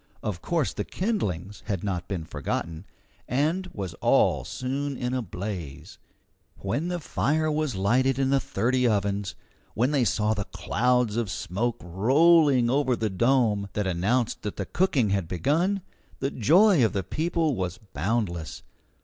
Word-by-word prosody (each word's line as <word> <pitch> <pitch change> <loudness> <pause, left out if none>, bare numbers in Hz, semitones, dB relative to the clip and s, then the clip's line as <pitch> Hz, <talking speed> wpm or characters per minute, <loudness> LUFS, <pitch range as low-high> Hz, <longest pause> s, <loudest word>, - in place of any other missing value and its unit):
Of 105 -6 -3
course 165 -6 0
the - - -3
kindlings 105 - -3
had 100 -5 -2
not 90 -3 -3
been 95 -4 -3
forgotten, 80 +3 -4 0.4
and 160 +8 0
was 95 -4 -5
all - - +3
soon 135 +2 -3
in 125 0 -2
a 130 - 0
blaze. 90 - -7 0.6
When 140 - -2
the 175 0 -2
fire 155 0 0
was 150 -5 -1
lighted 125 +7 +2
in 135 0 +1
the 140 - +4
thirty 125 +3 0
ovens, 100 -2 -1 0.4
when 125 +5 +2
they 140 -4 +2
saw 110 -1 +1
the 105 -2 -3
clouds 125 -3 0
of 115 -4 -1
smoke 105 +8 -2
rolling 135 - +4
above 130 -1 +1
the 110 -2 -1
dome, 110 -2 +2
that 105 - -1
announced 100 +7 0
that 105 - -4
the 100 - -2
cooking 135 - +1
had 100 -4 0
begun, 165 - 0 0.3
the 135 +1 -2
joy 170 - +5
of 110 - +2
the 100 -2 -1
people 160 - 0
was 95 -3 -3
boundless. 100 -4 -3
120 Hz, 155 wpm, -26 LUFS, 100-140 Hz, 0.6 s, joy